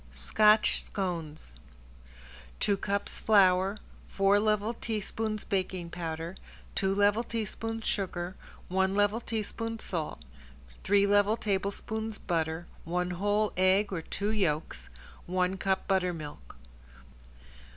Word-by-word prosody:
~SCOTCH 215 0 +4
SCONES~ 165 - -4 1.1
Two 200 - +2
cups 200 +1 -2
flour, 195 -1 +4 0.3
four 195 +1 +3
level 215 +1 +1
teaspoons 220 -1 -3
baking 185 -3 -2
powder, 165 0 -4 0.4
two 195 0 +1
level 205 +2 +4
tablespoons 225 0 -4
sugar, 185 -2 -2 0.3
one 190 +1 +1
level 205 +2 +3
teaspoon 225 0 -3
salt, 165 -7 -3 0.6
three 200 0 +4
level 205 +2 +3
tablespoons 215 +2 -2
butter, 165 -1 -2 0.2
one 180 +2 -1
whole 205 +4 +1
egg 190 +2 +3
or 170 - -2
two 200 +5 -2
yolks, 155 - -1 0.4
one 185 +1 +1
cup 190 0 -1
buttermilk. 175 - -2
195 Hz, 105 wpm, -30 LUFS, 180-210 Hz, 1.1 s, ~SCOTCH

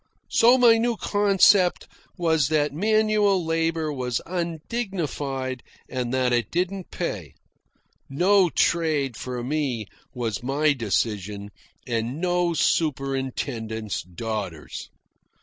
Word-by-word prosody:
So 240 +3 +6
my 235 -3 +6
new 235 0 0
concept 200 -3 +3 0.3
was 160 -5 +2
that 150 -2 +1
manual 210 0 +2
labour 165 -1 0
was 125 -3 -2
undignified, 160 - -3 0.3
and 125 -2 -3
that 130 -1 +1
it 120 -1 +1
didn't 185 +2 -2
pay. 95 - -5 0.7
No 180 +6 +4
trade 155 -7 +1
for 125 0 -5
me, 130 -5 -1 0.3
was 115 -5 -3
my 145 +4 +2
decision, 105 -4 -2 0.3
and 120 +3 -2
no 175 -1 +1
superintendent's 130 - -1
daughters. 95 -2 -6
150 Hz, 100 wpm, -24 LUFS, 120-180 Hz, 0.7 s, So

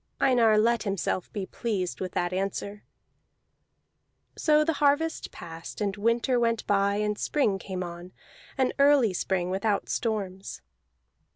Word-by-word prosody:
Einar 230 -5 +4
let 230 +1 +3
himself 195 -3 -2
be 200 -3 -4
pleased 195 -5 -3
with 185 -1 -4
that 175 0 -1
answer. 200 +2 -3 1.5
So 305 -1 +3
the 325 - +1
harvest 295 +3 +1
passed, 165 -1 -9
and 200 -2 -1
winter 230 +4 +1
went 230 -1 0
by 200 0 +2
and 210 0 -1
spring 215 -10 +1
came 185 -2 -5
on, 175 +1 -8 0.5
an 260 -1 +1
early 280 -7 +5
spring 180 0 -1
without 200 +2 -1
storms. 200 -4 -3
205 Hz, 130 wpm, -27 LUFS, 190-235 Hz, 1.5 s, early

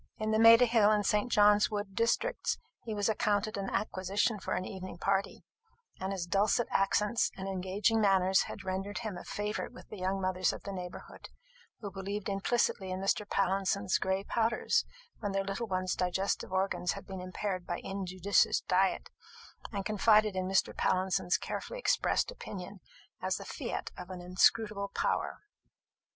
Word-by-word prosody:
In 215 0 -1
the 220 - +2
Maida 230 +2 +8
hill 225 -3 +4
and 210 -1 +2
St. 210 +5 +1
John's 210 0 +5
wood 205 -2 -4
districts 230 - 0 0.3
he 220 -2 -3
was 205 -1 0
accounted 210 0 0
an 195 -1 -3
acquisition 200 +2 0
for - - -2
an 185 - -2
evening 185 -2 -7
party; 195 +2 -1 0.6
and 190 +1 -3
his 190 -3 -3
dulcet 200 +6 +2
accents 210 +4 +2
and 190 0 -5
engaging 195 +4 +1
manners 190 -2 +4
had - - -7
rendered 195 +2 -3
him 210 -4 -3
a 175 - -8
favourite 210 +1 -3
with 255 - -14
the 210 - -8
young 190 +1 -1
mothers 185 -1 +1
of - - -9
the 200 - -5
neighbourhood, 180 -2 -8 0.5
who 200 -2 -5
believed 195 +2 -4
implicitly 195 -1 0
in 185 0 -3
Mr. 195 +2 0
Pallinson's 195 0 +1
gray 190 +1 0
powders 230 - +1 0.3
when 205 -3 -3
their 195 0 +1
little 200 +4 -3
ones' 185 -2 -1
digestive 185 +2 -1
organs 190 -2 0
had 195 - -9
been 190 -1 -7
impaired 185 0 -4
by 175 - -2
injudicious 195 0 +1
diet, 190 +1 +1 0.6
and 200 -3 -3
confided 215 -1 +4
in 185 0 -1
Mr. 190 0 +1
Pallinson's 185 -1 +1
carefully - - -5
expressed - - +1
opinion 195 - -8 0.4
as - - 0
the - - -8
fiat - - -4
of 180 0 -9
an 185 -1 -6
inscrutable 200 +3 +2
power. - - -1
195 Hz, 165 wpm, -31 LUFS, 185-210 Hz, 0.6 s, Maida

